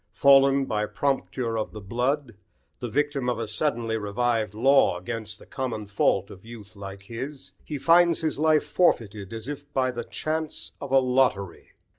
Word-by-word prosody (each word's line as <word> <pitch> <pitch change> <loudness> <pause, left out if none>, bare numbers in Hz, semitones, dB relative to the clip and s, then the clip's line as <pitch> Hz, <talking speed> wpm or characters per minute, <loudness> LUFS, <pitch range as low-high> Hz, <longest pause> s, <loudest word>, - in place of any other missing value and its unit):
Fallen 135 +2 +5
by 105 -3 -1
"prompture 130 -4 -1
of 110 - -4
the 110 - -7
blood," 125 +6 -1 0.5
the 120 - -4
victim 140 0 0
of 125 - -1
a 115 -1 -3
suddenly 115 -1 -1
revived 110 0 -1
law 135 -4 +4
against 110 +4 -5
the - - -15
common 120 -5 -4
fault 100 -1 +1
of 95 - -13
youth 110 -2 -12
like 100 -1 -9
his, 130 +7 -7
he 150 - -5
finds 170 +3 +4
his 155 -3 -1
life 155 -1 +3
forfeited 115 - +1
as 115 +1 -6
if 145 0 -7
by 130 -1 +1
the 120 -1 -5
chance 155 +4 -3
of 140 - -6
a 135 - +6
lottery. 125 -7 +1
125 Hz, 170 wpm, -26 LUFS, 110-140 Hz, 0.5 s, a